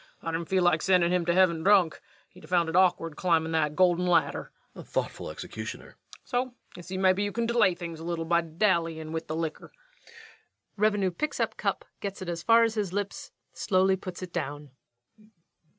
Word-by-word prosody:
I 165 - -2
didn't 165 0 -4
feel 190 -1 +2
like 175 -3 +3
sendin' 180 -2 +3
him 175 -2 0
to 170 - +3
heaven 180 -3 +3
drunk. 185 -3 +3 0.3
He'd 180 - -17
a - - -15
found 175 -2 +2
it 165 - -3
awkward 175 -4 +2
climbin' 165 -2 +1
that 155 -2 0
golden 180 0 +3
ladder. 175 - +1 0.2
REVENUE. - - -11
Thoughtful - - -3
executioner. - - -7
LUKE. - - -21 0.3
So 250 0 -2 0.2
you - - -9
see 185 +2 -6
mebbe 185 0 +3
you 205 0 0
kin 230 +3 -1
delay 225 -6 +3
things 170 -2 -7
a - - -8
little 165 -1 -3
by 170 +1 +3
dallyin' 165 -2 0
with 160 0 -4
the 155 - -3
licker. 160 -1 -4 1.0
REVENUE. 205 -2 +2
[_Picking 295 - -3
up - - -1
cup, - - -2
getting 195 -2 -5
it - - 0
as 170 -1 -4
far 230 +4 +5
as 225 -1 +1
his 210 -5 -2
lips, 200 +1 -4 0.2
slowly 190 0 +2
puts 185 -1 -8
it 180 - -8
down. 145 -3 -4
180 Hz, 200 wpm, -28 LUFS, 165-190 Hz, 1.0 s, far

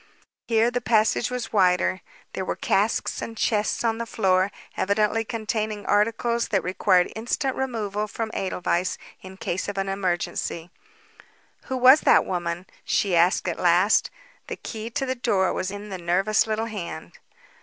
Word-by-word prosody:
Here 230 +1 +3
the 245 0 -2
passage 220 0 +2
was 250 -3 -5
wider. 185 -1 +2 0.3
There 190 - -3
were - - -2
casks 210 +3 0
and 225 - -6
chests 215 0 0
on 225 -1 0
the 235 - -4
floor, 190 -3 +2 0.2
evidently 210 +3 +1
containing 215 -2 -3
articles 230 +3 +1
that 200 -4 0
required 180 0 +2
instant 250 +4 -1
removal 215 -5 -2
from 220 +1 -4
Edelweiss 180 -1 -1 0.2
in 190 0 -11
case 185 -1 -3
of 200 - -5
an 195 0 -1
emergency. 180 -2 -2 0.9
"Who 260 - -3
was 260 +4 +7
that - - +5
woman?" 175 0 -3 0.2
she 195 -4 +1
asked 175 +2 +3
at 170 - -2
last. 180 +4 +3 0.4
The - - -4
key 225 0 -7
to 270 +3 -2
the 260 - -1
door 215 -7 +1
was 185 - -2
in 205 +1 -7
the 190 -2 -5
nervous 190 +6 +2
little 220 +1 -1
hand. 195 -7 -7
210 Hz, 155 wpm, -24 LUFS, 185-225 Hz, 0.9 s, was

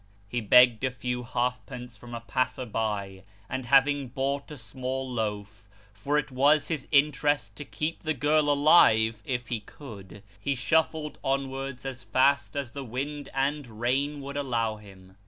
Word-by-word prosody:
He 120 +3 -2
begged 125 +2 +6
a 130 - +2
few 125 0 -4
halfpence 125 0 -3
from 120 -1 -10
a 115 - -6
passer 130 +1 -1
by, 100 -4 -3 0.3
and 130 +1 -4
having 140 +1 +4
bought 135 +3 -2
a 150 - -8
small 130 +2 -4
loaf 105 -4 -4 0.2
(for 140 +9 -1
it 150 - -1
was 145 +3 +3
his 155 -5 -3
interest 145 0 +2
to 145 - -7
keep 155 +3 -3
the 155 -1 -1
girl 150 0 +2
alive, 115 -7 +5
if 125 -1 -3
he 120 - -1
could), 105 -4 -12 0.2
he 140 +7 -1
shuffled 160 +3 0
onwards 135 -1 -2
as 130 -2 -5
fast 140 +3 +2
as 140 -4 -3
the 140 +1 -6
wind 140 +4 -5
and 135 -4 -2
rain 140 +4 0
would 140 +1 -6
let 115 -6 -1
him. 95 -2 -16
130 Hz, 160 wpm, -27 LUFS, 115-140 Hz, 0.3 s, begged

